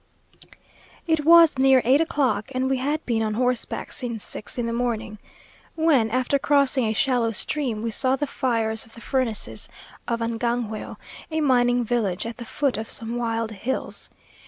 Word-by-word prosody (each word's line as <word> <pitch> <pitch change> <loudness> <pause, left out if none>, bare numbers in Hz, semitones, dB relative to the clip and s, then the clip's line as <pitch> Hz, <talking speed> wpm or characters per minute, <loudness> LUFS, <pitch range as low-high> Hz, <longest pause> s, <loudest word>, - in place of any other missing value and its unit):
It 320 -2 +1
was 330 -4 +7
near 265 -1 +5
eight 270 +5 +5
o'clock 280 -8 0
(and 260 +1 0
we 265 0 +1
had 290 +4 -2
been 230 -2 0
on 215 -1 -1
horseback 250 +1 -1
since 235 -4 -4
six 210 - -7
in 240 - -1
the 230 - -2
morning), 230 -3 -2 0.6
when, 300 -9 +3
after 255 +4 +1
crossing 280 -3 +2
a 220 - 0
shallow 240 -1 +1
stream, 235 -1 -1
we 230 - -2
saw 260 +4 +2
the 290 - -2
fires 225 -5 -1
of 225 - -15
the 230 - -12
furnaces 250 -5 -2 0.4
of 235 -1 -1
Angangueo, 230 -1 -2 0.3
a 315 -1 -1
mining 245 -3 +3
village, 220 -6 -1
at 230 +1 -6
the 240 - -7
foot 275 0 -1
of 220 - -6
some 230 +1 -3
wild 230 -2 -2
hills. 235 +6 -4
245 Hz, 170 wpm, -24 LUFS, 225-270 Hz, 0.6 s, was